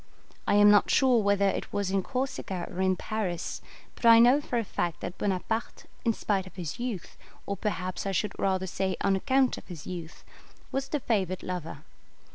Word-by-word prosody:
I - - +3
am 205 0 +7
not 205 - +5
sure 255 -4 +4
whether 200 -1 +3
it - - -2
was 200 -2 -1
in 195 0 +2
Corsica 255 -6 -3
or 180 - -4
in 185 0 +3
Paris, 185 -3 -3 0.3
but - - -16
I 230 -1 +9
know 245 +5 +6
for 250 - -2
a 230 - +1
fact 175 -5 -3
that 180 - -6
Bonaparte, 205 +4 -2 0.2
in 230 - +3
spite 195 -3 -1
of 185 - -14
his 180 +3 -5
youth, 240 -8 -5 0.3
or 200 - -2
perhaps 190 -2 -3
I - - 0
should 200 +2 -1
rather 190 -1 +1
say 190 +1 -2
on 195 - +3
account 260 +6 +2
of - - -19
his 170 -6 -9
youth, 175 -2 -7 0.5
was 270 0 -2
the 295 - -1
favoured 190 -6 -1
lover. 165 -5 -5
195 Hz, 195 wpm, -28 LUFS, 185-230 Hz, 0.5 s, I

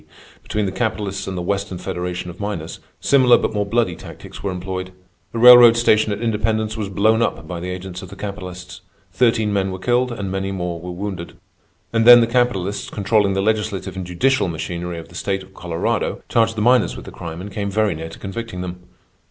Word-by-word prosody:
D., 75 - -28 0.3
between 105 -1 -2
the 95 - -2
capitalists 105 -2 -2
and 95 -1 -4
the 90 - -3
Western 100 0 -2
Federation 90 -1 -4
of 85 - -15
Miners, 100 -6 -4 0.2
similar 130 -3 +5
but - - -2
more 105 -1 -1
bloody 115 -5 +1
tactics - - -11
were 100 - -2
employed. 95 0 -5 0.4
The - - -5
railroad 120 -1 +9
station 110 -2 +3
at 100 - -2
Independence 110 -1 0
was 105 -3 -4
blown 110 +3 +2
up 80 -8 -1
by 85 +1 -5
the 90 +2 -5
agents 90 0 -6
of 95 - -10
the 100 - -10
capitalists. 90 -3 -7 0.3
Thirteen 110 0 +2
men 95 -1 +1
were 95 - -5
killed, 125 +5 +1
and 100 -5 -4
many 95 0 -2
more 90 -3 -3
were 90 - -7
wounded. 90 -1 -6 0.6
And 115 0 +2
then 120 0 +11
the 115 - +4
capitalists, 115 -5 0
controlling 100 -1 +1
the 95 - 0
legislative 105 -3 -1
and 95 - -4
judicial 100 +7 +1
machinery 85 +1 -4
of 80 - -9
the - - -16
state 95 -1 -2
of 95 +1 -18
Colorado, 85 -3 -2
charged 115 -1 +2
the 105 - 0
miners 125 0 +3
with - - -9
the - - -9
crime 85 -1 -7
and 100 +2 -7
came 100 -1 -2
very 105 0 +1
near 80 +1 -6
to 80 - -11
convicting 100 -1 -6
them. 90 0 -6
100 Hz, 210 wpm, -20 LUFS, 90-110 Hz, 0.6 s, then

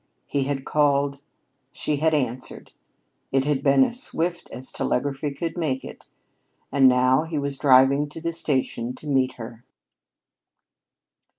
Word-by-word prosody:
He 140 -1 -1
had 135 -1 -3
called. 140 -1 +1 0.5
She 150 - -2
had 160 +2 +2
answered. 125 -3 -4 0.6
It 135 0 +2
had 145 -2 0
been 140 -1 +5
as 240 - -2
swift 170 -6 -3
as 130 +1 -7
telegraphy 140 +2 -2
could 160 +4 -4
make 145 -7 -2
it. - - -11 0.6
And 135 -2 +6
now 130 +2 +3
he 160 -1 -4
was 140 -1 -2
driving 135 +1 +4
to 150 - -9
the 170 +1 -3
station 130 -6 -1
to 140 - -13
meet 135 -3 +1
her. 115 0 -10
140 Hz, 140 wpm, -24 LUFS, 130-150 Hz, 0.6 s, And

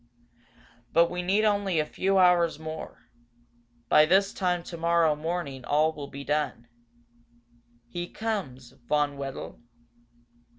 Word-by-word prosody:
But 170 +1 +4
we 180 0 -3
need 195 +4 +2
only 200 -4 +1
a 155 - +1
few 195 +5 0
hours 180 -3 +4
more. 160 0 -8 0.8
By 150 +5 +6
this 195 +3 +3
time 180 -2 -1
tomorrow 170 -2 +1
morning 155 -4 -4
all 155 +4 +2
will 145 -2 -7
be 140 +1 -8
done. 145 -5 -2 1.2
He 175 +8 -5
comes, 150 - -4 0.2
Von 145 -1 +1
Wedel?" 135 -1 -7
165 Hz, 120 wpm, -27 LUFS, 150-180 Hz, 1.2 s, By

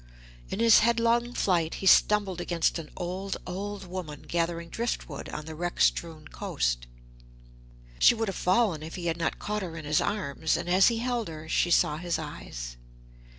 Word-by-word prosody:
In - - -4
his 230 -1 +7
headlong 235 +1 +2
flight 170 -4 +1
he - - -6
stumbled 195 -2 +4
against 170 -1 0
an 155 - -8
old, 185 +2 -3
old 195 +2 -5
woman, 175 -5 -7
gathering 170 0 -2
drift 235 +5 -2
wood 140 -3 -7
on 150 - -6
the 160 - -7
wreck 175 +2 -4
strewn 160 -2 +1
coast. - - -2 1.1
She - - +7
would 225 -1 -1
have 195 - -3
fallen 185 -4 +2
if 160 +1 -7
he 180 -2 -6
had 165 -1 0
not 165 -1 -1
caught 210 0 -3
her 170 -3 -6
in 155 - -7
his 150 +1 +2
arms, 160 -6 -1
and 175 - -5
as 185 +2 +5
he 235 - +2
held 240 -1 -1
her 160 -1 -8
she 175 - +1
saw 150 -3 +3
his 175 +1 -2
eyes. - - -7
175 Hz, 185 wpm, -28 LUFS, 160-205 Hz, 1.1 s, his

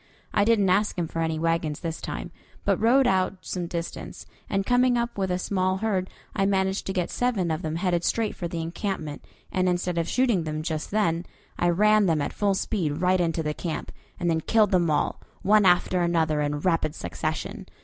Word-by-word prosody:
I 205 - +3
didn't 205 -4 +3
ask 205 +2 +2
him 170 -2 -1
for 165 - -5
any 160 -1 0
wagons 165 -2 -1
this 165 -1 -4
time, - - -5 0.3
but - - +2
rode 255 +4 +5
out 190 -3 +2
some 180 -2 -4
distance, 170 0 -6 0.2
and 195 0 0
coming 245 +1 +3
up 235 0 -1
with 190 -2 -1
a 180 - +1
small 185 0 0
herd 190 -3 -1 0.3
I 195 - +2
managed 190 0 0
to - - -1
get 180 -3 -1
seven 215 -9 0
of 160 +1 -2
them 155 -2 -3
headed 175 -1 0
straight 225 +2 0
for 175 - -4
the 170 -1 -4
encampment, 165 -2 -4 0.3
and 185 0 +1
instead 180 -1 0
of 165 - -1
shooting 240 -8 +2
them 155 0 -3
just 155 -1 -3
then, 175 -5 0 0.3
I 175 - +3
ran 210 +3 +4
them 160 -3 +2
at 145 - -2
full 200 -2 +1
speed 185 -7 -1
right 180 +1 +2
into 165 -1 0
the 150 0 -1
camp, 165 0 -4 0.3
and 175 - -1
then 160 -1 +1
killed 215 +3 +3
them 175 -3 +3
all, 150 - 0 0.2
one 205 0 +5
after 180 0 +3
another, 160 -3 +1
in 145 0 -1
rapid 165 -3 +1
succession. 85 - -4
180 Hz, 205 wpm, -26 LUFS, 165-200 Hz, 0.3 s, rode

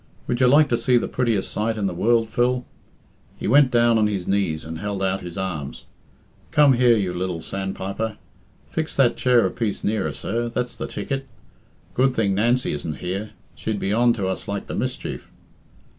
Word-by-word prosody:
Would 120 - -1
you 130 - +5
like 145 +4 +6
to 120 - +1
see 125 +1 +3
the - - 0
prettiest 115 -6 0
sight 110 +1 -1
in 105 - -1
the 95 - -1
world, 115 +5 +2
Phil?" 125 +2 +1 0.7
He - - -4
went 135 +3 +6
down 120 -2 +4
on 105 - +3
his 100 -4 -3
knees 95 -6 0
and 80 0 -6
held 100 -1 -3
out 95 0 0
his 85 0 -8
arms. 85 -8 -4 0.6
"Come 145 -2 +5
here, 120 -2 +4
you 95 -4 -1
lil 90 -1 -2
sandpiper. 95 +4 -4 0.5
Fix 160 -1 -3
that 125 -4 +4
chair 125 -2 +3
a - - 0
piece 110 -4 -3
nearer, 100 -7 0
sir 115 - -3
that's 125 +1 -3
the - - -5
ticket. 135 -1 -4 0.7
Good 130 0 +2
thing 100 -3 +1
Nancy 120 +5 +2
isn't 75 +1 -4
here. 95 +4 -4 0.2
She'd 110 -2 -3
be 100 0 -1
on 120 +2 +4
to 100 -5 -2
us 95 - -4
like 100 -1 -3
the - - -6
mischief. - - -4
110 Hz, 190 wpm, -23 LUFS, 95-120 Hz, 0.7 s, like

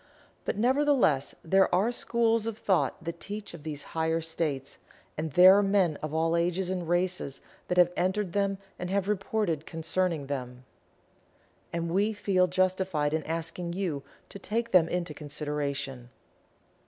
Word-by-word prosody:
But, - - -2
nevertheless, 250 - +2
there 190 +3 +4
are 205 +6 +2
schools 230 -2 +1
of 225 -2 -3
thought 190 -4 0
that 170 +1 -5
teach 205 -1 -6
of 170 - -9
these 150 -1 -6
higher 160 0 +1
states, 155 -4 -3 0.4
and 155 0 -3
there 185 +2 +9
are - - +4
men 195 -6 +2
of 155 - -4
all 165 +1 +1
ages 175 +2 0
and 180 -3 -3
races 175 -6 -1 0.3
that 180 - -1
have 175 -1 +6
entered 185 0 0
them 200 -1 +1 0.2
and 180 - -4
have 195 0 0
reported 195 -5 -1
concerning 165 -1 -1
them. 125 -2 -5 1.1
And 170 0 -2
we 205 +4 +2
feel 190 -3 +2
justified 185 -4 0
in 160 - +1
asking 165 +2 -3
you 175 -7 -2 0.3
to 200 - -9
take 230 +4 -2
them 170 -3 +5
into 175 -3 -2
consideration. 145 -4 -4
175 Hz, 155 wpm, -28 LUFS, 155-195 Hz, 1.1 s, there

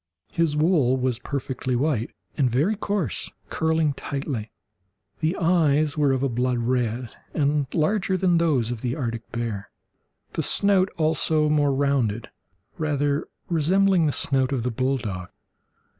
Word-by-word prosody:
His 165 -3 +1
wool 150 -6 +3
was 125 -2 -1
perfectly 130 -1 -3
white, 125 -3 0 0.3
and 135 -4 +2
very 150 - +1
coarse, 200 -5 -2 0.2
curling 160 -2 +1
tightly. 135 -5 -4 0.7
The 160 +3 0
eyes 155 -4 +2
were 145 -3 +3
of 130 0 0
a - - +3
blood 125 0 0
red, 120 0 -1 0.3
and 145 -1 +1
larger 190 +4 +1
than 180 -2 +3
those 135 -9 +1
of 120 -3 -5
the 125 0 -1
Arctic 115 -4 -4
bear, 115 -5 -4 0.6
the - - -1
snout 195 -2 +3
also 155 -1 +2
more 145 -2 +3
rounded, 135 -6 0 0.5
rather 145 -1 0 0.2
resembling 180 +1 +3
the - - +2
snout 135 -1 0
of 130 -4 -1
the 125 - -1
bulldog. 115 -7 -2
140 Hz, 140 wpm, -24 LUFS, 125-160 Hz, 0.7 s, wool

